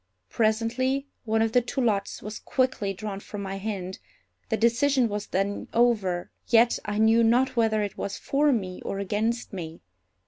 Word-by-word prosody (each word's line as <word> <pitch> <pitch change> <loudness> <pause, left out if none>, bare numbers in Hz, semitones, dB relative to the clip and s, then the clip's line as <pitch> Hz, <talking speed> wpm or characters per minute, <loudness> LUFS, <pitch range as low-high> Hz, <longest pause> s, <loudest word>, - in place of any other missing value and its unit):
Presently 235 +5 +1 0.2
one 220 0 +2
of 225 - 0
the 245 - +4
two 245 +3 -4
lots 210 -5 0
was 210 +1 -6
quickly 255 -6 0
drawn 195 0 -5
from 200 0 -7
my 195 0 -4
hand. 195 -2 -4 0.5
The 220 - +1
decision 250 +3 +3
was 210 -1 -4
then 195 +2 -1
over, 210 -7 +2 0.2
yet 235 0 +4
I 210 0 -2
knew 225 +2 +5
not 250 +3 +3
whether 220 -2 +2
it 205 - -5
was 200 - -3
for 290 +1 +2
me 190 -7 -2
or - - -3
against 215 +4 -1
me. 165 -3 -7
220 Hz, 170 wpm, -26 LUFS, 200-240 Hz, 0.5 s, knew